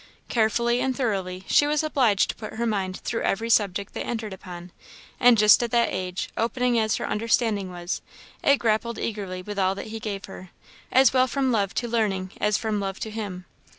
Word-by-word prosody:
Carefully 235 +1 +2
and 260 -1 -1
thoroughly 190 -7 -2
she 290 - +4
was 300 +1 +1
obliged 250 -10 +2
to - - -17
put 215 - -8
her 235 +1 -1
mind 195 -4 -1
through 230 - -2
every 230 +4 0
subject 200 -2 +1
they - - -4
entered 220 -4 -4
upon; 180 -1 -10 0.5
and 245 -1 +6
just 210 +2 +6
at 240 - -1
that 235 0 +2
age, 180 -1 -3
opening 240 +1 +1
as 220 0 +1
her - - -3
understanding 215 -3 0
was, 175 0 -4 0.4
it 280 - +5
grappled 230 0 0
eagerly 195 -4 -4
with 205 +1 -5
all 190 0 +2
that 210 - -7
he 225 - -4
gave 205 -2 -5
her, 185 -1 -11 0.4
as 260 -1 +5
well 255 0 +4
from 265 0 0
love 200 -4 0
to 240 - -1
learning 200 -5 -1
as 210 -1 +2
from 220 -2 -2
love 195 -1 -4
to 220 - -5
him. 200 -5 -6
215 Hz, 200 wpm, -25 LUFS, 195-235 Hz, 0.5 s, and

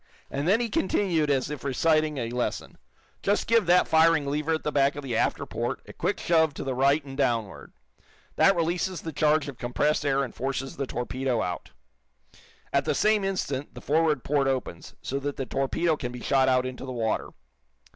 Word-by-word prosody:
And 140 +3 -2
then 205 +5 +4
he 240 - 0
continued 185 -7 +1
as 140 0 +1
if 150 -4 -6
reciting 155 +2 +1
a 115 -2 -3
lesson: 125 0 -3 0.4
"Just 205 +1 +1
give 230 -5 +3
that 180 +1 +5
firing 160 -2 +4
lever 150 +3 0
at 160 - -6
the 150 - -1
back 140 -1 +2
of 145 - -6
the 125 -4 -3
after - - 0
port - - -3
a - - -11
quick - - -2
shove 160 -3 +2
to - - -5
the 135 - -2
right 140 +3 +2
and 135 -1 -8
downward. 115 -7 -1 0.6
That 195 - +5
releases 175 +2 -1
the 160 - -5
charge 150 0 +2
of 140 -4 -8
compressed 145 +5 0
air 140 -1 +1
and 130 - -6
forces 135 +1 -3
the 140 - -2
torpedo 125 -1 -2
out. 90 -2 -5 1.0
At 140 0 +2
the 150 -2 0
same 215 +3 +3
instant 150 -8 -3
the - - -7
forward 155 -3 +1
port 140 -1 +1
opens, 135 -1 -3
so 140 - -2
that 145 0 -3
the 135 - -3
torpedo 135 +6 0
can 125 -4 -5
be 125 0 -8
shot 135 -1 +3
out 130 0 +2
into 130 0 -6
the 130 - -5
water. 115 -3 -1
140 Hz, 200 wpm, -26 LUFS, 130-160 Hz, 1.0 s, that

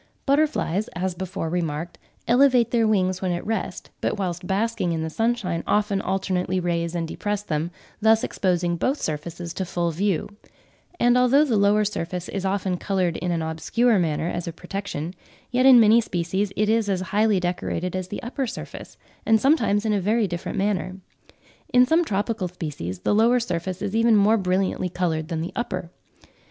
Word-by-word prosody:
Butterflies, 275 - +1
as 185 +1 -1
before 185 -1 -4
remarked, 165 -1 -3 0.3
elevate 245 -1 +4
their 230 -2 +3
wings 185 -3 +1
when 185 -1 0
at 175 - -4
rest, 225 +1 -4
but - - -1
whilst 180 -2 -3
basking 195 -3 0
in 160 -1 -2
the 160 - -4
sunshine 215 -6 -1
often 210 -1 +1
alternately 185 -1 -1
raise 170 -1 -1
and 165 -1 -2
depress 205 +4 -3
them, 160 -3 -2 0.3
thus 220 +1 +4
exposing 175 -2 0
both 265 - 0
surfaces 165 +3 -4
to 190 - -3
full 175 -1 -1
view; 185 +1 -1 0.7
and 245 +1 +4
although 265 +4 +5
the 250 -6 0
lower 205 +1 +3
surface 180 -3 -4
is 195 -1 -3
often 190 -1 -1
coloured 185 -3 0
in 180 - -3
an 170 -2 0
obscure 200 +8 +1
manner 160 -1 0
as 175 0 -3
a - - -2
protection, 180 -2 -5 0.4
yet 255 +2 +4
in 255 -2 +9
many 225 +1 +6
species 190 +1 -2
it 210 - +1
is 220 -1 +2
as 190 -2 0
highly 210 -1 +3
decorated 180 0 -2
as 185 -1 -3
the 205 - -6
upper 260 +2 -3
surface, - - -8 0.3
and 225 0 +4
sometimes 225 -6 +2
in 215 - +2
a 200 - +1
very 215 +3 +2
different 175 +2 -5
manner. 190 -2 -1 0.8
In 250 0 +6
some 320 +6 +3
tropical 205 - -1
species 150 - -5
the - - +1
lower 230 +4 +4
surface 185 -3 -3
is 205 +1 -2
even 230 0 +4
more 210 +2 +4
brilliantly 185 -1 0
coloured 165 -3 -1
than 165 -2 -3
the 170 - -5
upper. 185 -7 -4
190 Hz, 180 wpm, -24 LUFS, 175-220 Hz, 0.8 s, in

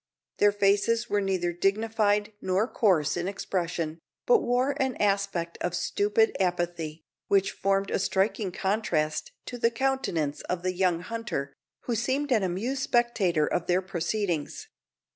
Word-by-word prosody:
Their 205 - +6
faces 205 +3 +2
were 205 - +2
neither 185 -3 0
dignified 210 +2 +1
nor 190 +4 +1
coarse 180 - +2
in 175 +1 -2
expression, 170 -4 -3 0.3
but 480 -2 +5
wore 250 +3 +1
an 265 -2 0
aspect 195 -4 0
of 175 0 -1
stupid 210 +4 +1
apathy, 175 -3 -2 0.2
which 195 -1 +3
formed 195 0 0
a - - +1
striking 195 +1 0
contrast 180 -6 -1
to 245 - -6
the 230 - +4
countenance 235 - -1
of 180 -1 -2
the 185 0 0
young 180 -2 +1
hunter, 185 -10 -4 0.3
who 245 - -2
seemed 265 +5 -1
an 225 -4 +4
amused 205 +9 -2
spectator 210 - +2
of 175 +2 -2
their 180 +1 +2
proceedings. 175 -2 -2
195 Hz, 140 wpm, -27 LUFS, 175-225 Hz, 0.3 s, Their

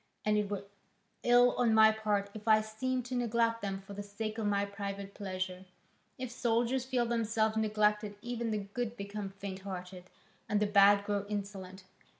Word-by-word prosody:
And 210 0 +3
it 210 -1 0
were 200 -1 -3 0.6
ill 245 0 +6
on 230 -3 +3
my 220 0 +8
part 210 -2 -1
if 215 0 -10
I 215 -1 +6
seemed 245 +4 -2
to 255 - -6
neglect 230 -1 +1
them 195 -1 -3
for 200 +1 -10
the 200 - -5
sake 215 +2 -5
of 215 - 0
my 200 0 +2
private 200 0 -6
pleasure. 185 -2 -4 0.5
If 255 -1 -5
soldiers 240 +2 +1
feel 255 -2 +1
themselves 225 -2 +1
neglected 210 -1 +1
even 235 -1 -2
the 215 - 0
good 220 +4 -4
become 200 0 -5
faint 195 -1 -7
hearted, 185 -1 -7 0.4
and 210 - +2
the 210 - +2
bad 200 0 +5
grow 205 -1 -1
insolent. 195 -2 -5
210 Hz, 175 wpm, -32 LUFS, 200-230 Hz, 0.6 s, my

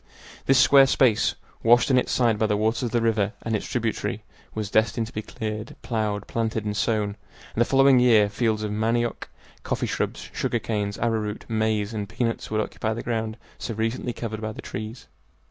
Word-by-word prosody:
This 135 - +5
square 135 +1 +7
space, 125 -5 +3 0.3
washed 120 +3 +5
on 130 - +5
its - - -2
sides 115 -4 +2
by 110 - +2
the 105 -1 +1
waters 110 +2 +1
of 120 - -1
the 115 0 0
river 110 -2 +1
and 115 -1 -1
its 105 - -3
tributary, 115 -3 -2 0.3
was 105 -2 -3
destined 110 +1 +2
to 110 - -12
be 110 - -3
cleared, 110 -1 -5
plowed, 105 -3 -1
planted, 110 -2 -2
and 105 0 -2
sown, 105 -2 0 0.4
and 115 - 0
the - - +5
following 135 0 +5
year 115 -4 +5
fields 110 +1 0
of 105 - -2
manioc, 115 +2 -1 0.3
coffee - - -2
shrubs, - - -3
sugar - - 0
canes, 105 -2 -2
arrowroot, 110 -2 -1
maize, 110 -1 0
and 105 -2 -4
peanuts 115 0 -2
would 110 0 +1
occupy 110 +1 -2
the 115 - -5
ground 110 -1 -2 0.2
so 115 - -4
recently 115 +3 -1
covered 110 -2 -5
by 110 0 -3
the - - -11
trees. 110 +3 -6
110 Hz, 195 wpm, -25 LUFS, 105-120 Hz, 0.4 s, square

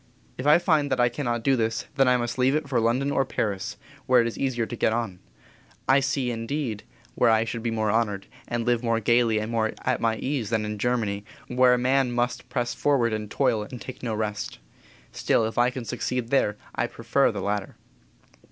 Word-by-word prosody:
"If 130 - -4
I 150 - +8
find 155 -5 +2
that 130 - +1
I 120 0 +4
cannot 120 -3 -2
do 135 +1 +3
this, 115 -2 -1
then 135 -2 +3
I 125 0 +5
must 120 +1 -3
leave 130 +3 +3
it 155 -2 -1
for 130 -4 +1
London 125 +5 +1
or 135 - +2
Paris, 105 -5 -3 0.3
where 130 -1 +6
it 115 - +3
is 115 - -3
easier 125 -4 -1
to 120 - -6
get 110 - +1
on. 115 -6 -3 0.7
I 135 +2 +6
see 135 -2 -1
indeed 115 -1 -3 0.3
where 120 - +3
I 110 0 +3
should 115 0 -4
be 115 - -1
more 110 -2 0
honored, 105 -3 0 0.2
and 120 -1 -2
live 120 -1 +2
more 115 -2 +1
gaily 115 0 +3
and 110 +2 -2
more 110 -1 0
at - - 0
my 115 -1 +1
ease 130 -6 -2
than 110 -2 0
in 105 0 -4
Germany, 110 -4 0 0.3
where 125 0 +5
a - - -1
man 130 +1 +2
must 120 +1 -1
press 120 -1 -1
forward, 125 -6 +1
and 105 -1 -3
toil, 110 0 +1
and 120 +4 -7
take 130 - -9
no 115 -3 -2
rest, 105 -1 -3 0.5
still, 115 - +1
if 110 +2 -2
I 120 +1 +4
can 125 -1 -6
succeed 120 +2 -3
there, 105 -6 +2 0.2
I - - 0
prefer - - +1
the - - -5
latter." 100 -2 -2
120 Hz, 215 wpm, -25 LUFS, 110-130 Hz, 0.7 s, I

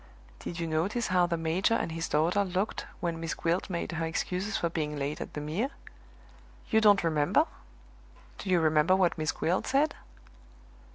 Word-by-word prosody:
"Did 170 - -6
you 170 - -1
notice 175 +9 0
how 180 -1 +3
the 170 -1 -1
major 165 +7 +1
and 170 - -1
his 165 0 -3
daughter 170 +7 +2
looked 190 +2 -2
when 170 -2 -2
Miss 165 -1 -3
Gwilt 170 +4 -1
made 170 -2 -3
her 165 0 -2
excuses 185 +5 -2
for 170 - 0
being 150 -3 -3
late 145 +1 -3
at - - -7
the 150 - -3
Mere? 170 - -1 1.0
You 220 - +5
don't 205 -3 +6
remember? 155 -3 +3 0.9
Do 195 - -5
you 180 -2 +4
remember 155 +3 +4
what 185 -2 +2
Miss 155 0 +1
Gwilt 175 +3 -1
said?" 280 +4 +2
170 Hz, 175 wpm, -29 LUFS, 160-190 Hz, 1.0 s, don't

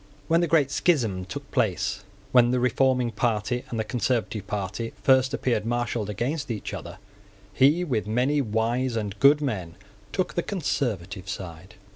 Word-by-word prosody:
When 165 +1 +3
the 170 - +2
great 150 -4 +3
schism 115 - +1
took 90 - -8
place, 105 - 0 0.3
when 120 -1 +6
the 125 0 +1
reforming 125 -1 +2
party 115 +2 -1
and 115 - -3
the - - +1
conservative 115 -4 -1
party 105 +3 -3
first 130 0 +4
appeared 125 -6 0
marshalled 120 -2 -1
against 135 - -2
each 110 -4 -4
other, - - -7 0.6
he, 145 - +4
with 120 -11 -1
many 130 +7 +2
wise 115 +2 0
and 105 -3 -2
good 145 +4 +6
men, 95 - -3 0.4
took 185 - -1
the 175 - 0
conservative 100 - -3
side. 90 -2 -7
120 Hz, 155 wpm, -26 LUFS, 105-135 Hz, 0.6 s, when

